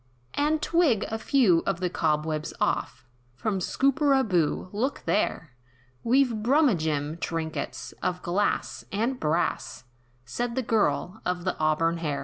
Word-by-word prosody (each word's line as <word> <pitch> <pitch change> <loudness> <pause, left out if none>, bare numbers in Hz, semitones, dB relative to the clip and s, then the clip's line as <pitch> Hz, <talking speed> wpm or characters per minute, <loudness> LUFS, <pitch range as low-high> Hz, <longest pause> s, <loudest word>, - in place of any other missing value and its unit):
"And 300 +1 +1
twig 315 - +3
a 220 - -3
few 220 - +4
of 195 -3 0
the 185 - 0
cobwebs 155 -2 -1
off, - - -1 0.3
From 200 - -1
Scooperaboo, 260 - +1
look 250 +7 -2
there! 165 -7 0 0.5
We've 240 -2 +2
Brumagem 170 - +1
trinkets, 160 -2 -4
of 180 0 -2
glass, 190 +4 -1
and 235 +5 -1
brass!" 155 -3 -1 0.4
Said 240 - -3
the 260 - 0
girl, 220 -3 0
of 180 -1 -2
the 185 - -1
auburn 155 +2 +2
hair. 150 -4 -2
195 Hz, 125 wpm, -26 LUFS, 165-250 Hz, 0.5 s, few